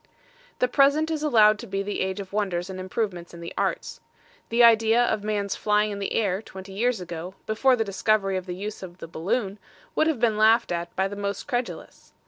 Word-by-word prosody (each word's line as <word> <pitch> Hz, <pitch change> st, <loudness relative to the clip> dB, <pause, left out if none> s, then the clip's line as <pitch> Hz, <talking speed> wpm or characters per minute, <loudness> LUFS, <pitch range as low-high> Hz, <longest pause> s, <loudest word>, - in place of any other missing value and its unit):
The 250 Hz, -, +2 dB
present 285 Hz, +5 st, +3 dB
is 310 Hz, -2 st, -2 dB
allowed 215 Hz, -8 st, +5 dB
to -, -, -8 dB
be 195 Hz, +1 st, -2 dB
the 205 Hz, +1 st, -3 dB
age 190 Hz, +1 st, -2 dB
of 195 Hz, -1 st, -8 dB
Wonders 190 Hz, -3 st, -1 dB
and 185 Hz, -, -7 dB
Improvements 185 Hz, -2 st, -4 dB
in -, -, -10 dB
the 170 Hz, 0 st, -7 dB
Arts. -, -, -2 dB, 0.5 s
The 235 Hz, +1 st, +4 dB
idea 230 Hz, +1 st, +5 dB
of 215 Hz, -3 st, -1 dB
Man's 205 Hz, -2 st, -1 dB
flying 210 Hz, 0 st, +1 dB
in 200 Hz, -, -5 dB
the 200 Hz, -, -3 dB
Air, 195 Hz, -3 st, 0 dB
twenty 190 Hz, -2 st, -11 dB
years 235 Hz, +2 st, 0 dB
ago, 175 Hz, +1 st, -7 dB
before 250 Hz, +5 st, +3 dB
the 225 Hz, -, 0 dB
discovery 200 Hz, 0 st, +1 dB
of 185 Hz, 0 st, -4 dB
the 180 Hz, -, -4 dB
use 205 Hz, +3 st, -6 dB
of 180 Hz, -2 st, -9 dB
the 165 Hz, -, -8 dB
balloon, 195 Hz, +5 st, -2 dB, 0.3 s
would 315 Hz, -, +2 dB
have 315 Hz, -7 st, 0 dB
been 220 Hz, -3 st, +2 dB
laughed 225 Hz, +1 st, +4 dB
at 170 Hz, 0 st, -4 dB
by 190 Hz, +1 st, +1 dB
the 200 Hz, -, -7 dB
most 200 Hz, -1 st, -4 dB
credulous! 245 Hz, -3 st, -5 dB
205 Hz, 215 wpm, -25 LUFS, 190-225 Hz, 0.5 s, allowed